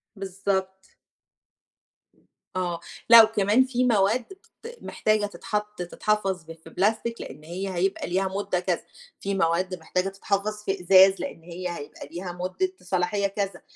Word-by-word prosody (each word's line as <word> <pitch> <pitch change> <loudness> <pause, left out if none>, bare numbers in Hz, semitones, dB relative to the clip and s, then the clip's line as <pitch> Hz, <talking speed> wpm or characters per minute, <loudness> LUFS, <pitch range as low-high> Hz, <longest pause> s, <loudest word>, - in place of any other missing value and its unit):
بالضبط. 190 0 -3 1.6
آه، 175 -2 -1 0.3
لأ 230 -1 +11
وكمان 215 +2 +3
في 255 -1 0
مواد 225 +1 +3
بت 390 +4 -15 0.3
محتاجه 215 -1 +1
تتحط 210 0 -4
تتحفظ 195 0 -1
ب 165 - -11
في 165 0 -15
بلاستيك 220 +6 0
لأن 150 - -9
هي 185 +4 -4
هيبقى 190 +3 0
ليها 190 +2 +1
مُدة 195 -1 -1
كذا، 180 - -1 0.4
في 200 0 -2
مواد 180 +1 +1
محتاجه 180 +4 -1
تتحفظ 200 +2 -2
في 195 -2 -2
إزاز 190 +2 +7
لأن 220 -12 -6
هي 175 +1 -5
هيبقى 145 -1 -9
ليها 175 +2 -5
مُدة 185 - -2
صلاحية 200 +2 0
كذا. 200 0 -3
195 Hz, 140 wpm, -26 LUFS, 180-210 Hz, 1.6 s, لأ